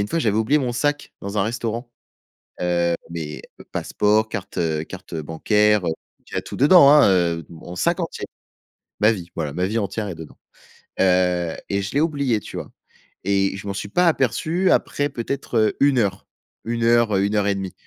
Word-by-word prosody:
une 100 - -1
fois, 165 - -1
j'avais 110 -8 +1
oublié 115 +7 +3
mon 125 -4 -1
sac 145 +4 -1
dans 100 +1 -5
un 105 - +3
restaurant. 115 +2 -3 0.7
Heu, 85 -1 +1 0.2
mes 80 -3 -6 0.3
passeports, 105 +1 +1
cartes, 100 -4 -6
heu, 80 -2 0
cartes 95 -1 -10
bancaires, 105 +6 +2
heu - - +1
c - - 0 0.4
il - - -13
y - - -1
a - - 0
tout - - -8
dedans, 145 +1 +7
hein, 150 0 +7
heu, 85 -3 +1
mon 85 +1 -10
sac - - +1
entier. - - -4 0.7
Ma 105 +2 +5
vie, 90 -5 -8
voilà, 75 -4 -3
ma 90 +3 0
vie 105 +4 -1
entière 105 +1 -3
est 90 - -5
dedans. 80 -1 -11 0.6
Heu 90 -2 +2
et 100 0 0
je 100 - -5
l'ai 145 - +2
oublié, 140 -8 +1
tu - - -9
vois? - - -7 0.5
Et 95 0 +1
je 100 - -8
m'en 100 - -2
suis 100 +1 -4
pas 180 - +3
aperçu 165 - +1
après, 145 0 +1
peut-être, 125 0 -3
heu, 110 -1 +2
1 140 -3 +4
heure, 100 -3 -1 0.4
1 115 0 -2
heure, 115 -2 +3
heu, 95 - +2
1 105 +1 -1
heure 105 - +2
et 100 - +2
1/2. 95 -1 -5
105 Hz, 205 wpm, -22 LUFS, 90-120 Hz, 0.7 s, dedans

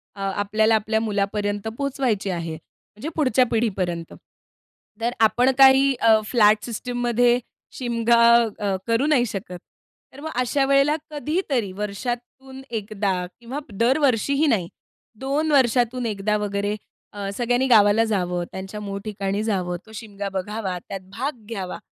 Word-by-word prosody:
अ 200 - -9
आपल्याला 215 +2 +2
आपल्या 220 +1 0
मुलापर्यंत 205 -1 -1
पोहोचवायची 260 -8 -1
आहे. 170 -3 -3
म्हणजे 210 - -11
पुढच्या 255 -5 +3
पिढीपर्यंत, 185 -7 -1 0.9
तर 235 +1 +1
आपण 240 +4 +4
काही 270 0 +6 0.3
फ्लॅट 215 -2 +4
सिस्टममध्ये 245 0 +1 0.4
शिमगा 235 -1 +2 0.4
अ, 200 -2 0
करू 230 +4 +2
नाही 275 -6 +3
शकत 185 -4 -6 0.5
तर 270 - -12
मग 315 - -5
अशा 270 +3 +1
वेळेला 275 +2 +3 0.2
कधीतरी 295 - -1
वर्षातून 245 +5 -5
1दा 210 -2 -2 0.3
किंवा 245 +4 -6
दरवर्षीही 265 +5 +2
नाही, 210 -11 +1 0.5
2 290 +4 0
वर्षातून 245 -2 +2
1 210 -1 0
वगैरे 205 0 -2 0.6
सगळ्यांनी 245 +2 +1
गावाला 215 -2 +5
जावं, 180 -5 -1
त्यांच्या 190 +2 -7
मूळ 200 -1 -5
ठिकाणी 200 -1 -2
जावं, 185 -5 -1
तो 220 - -16
शिमगा 205 -2 -6
बघावा, 195 0 -3
त्यात 195 - -4 0.2
भाग 255 -3 -4
घ्यावा, 195 -5 -4
225 Hz, 125 wpm, -23 LUFS, 200-255 Hz, 0.9 s, काही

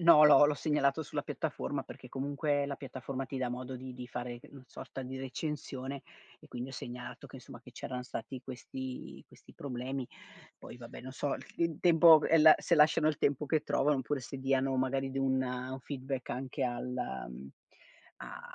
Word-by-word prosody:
no 165 -3 +8
l'ho 145 -1 +9
l'ho 150 - +1
segnalato 150 0 +1
sulla - - -3
piattaforma - - -3
perché - - -11
comunque 145 +1 0
la 140 - -3
piattaforma 135 0 -5
ti 135 - -6
dà 130 -1 0
modo 125 +1 -5
di 130 0 -8
di 125 0 -7
fare 120 0 -5
c - - -15
una 135 -2 -13
sorta 130 +2 -8
di 130 +1 -6
recensione 135 0 -4 0.4
e - - -16
quindi 125 +2 -5
ho - - -10
segnalato 125 -1 -7
che - - -10
insomma - - -11
che - - -14
c'erano 125 -1 -5
stati 125 +1 -6
questi 130 0 -7
questi - - -18
problemi. 130 -1 -4 0.5
Poi - - -10
vabbè 115 -1 -10
non 130 +1 -8
so 140 +1 -1
il 130 - -8
il 165 -2 +1
tempo 165 -2 +8
e 165 - +5
la 155 0 +10
se 170 - +2
lasciano 155 0 +5
il 155 -2 +2
tempo 145 +1 +1
che 155 +2 +2
trovano, 145 0 +2
oppure 140 +2 -1
se 135 +2 -7
diano 135 0 +1
magari 135 +1 0
di 135 - -2
un 130 -1 +2
un 130 +1 -4
feedback 135 -1 -4
anche 130 +2 -2
al, 120 0 -2 0.4
mhmm, 65 +2 -9 0.7
a - - -8
135 Hz, 195 wpm, -32 LUFS, 125-145 Hz, 0.7 s, la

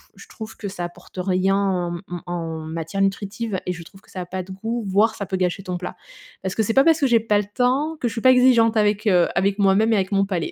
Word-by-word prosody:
Je - - -14
trouve 220 -2 -9
que 205 - -6
ça 175 -2 -5
apporte 175 +2 -13
rien 190 +1 +1
en 185 -3 0
m - - -10
mmh 175 0 -5
en 165 -2 -4
matière 165 +4 -4
nutritive 200 +1 -1
et 180 - -1
je 175 -1 -9
trouve 195 +3 -16
que - - -26
ça 185 - -6
a - - -5
pas 185 +1 -5
de 190 - -12
goût, 225 +4 -4
voire 210 +4 +3
ça 205 - -4
peut 190 - -3
gâcher 185 +1 -1
ton 180 -2 -3
plat. 180 0 -7 0.4
Parce 190 -1 -4
que 220 - +1
c'est 225 - -1
pas 270 +2 +5
parce 325 -2 +4
que 275 - +4
j'ai 235 -2 +4
pas 215 -2 +1
le 205 - -2
temps, 270 +7 +1
que 245 - 0
je 230 - -4
suis 230 - -4
pas 255 - +7
exigeante 240 -3 +4
avec, 210 0 +2
heu, 180 -4 +4
avec 175 - +2
avec 195 - -13
moi-même 200 +3 +3
et - - +4
avec 190 0 -1
mon 195 0 +3
palais. 180 -5 -2
195 Hz, 290 wpm, -22 LUFS, 180-225 Hz, 0.4 s, pas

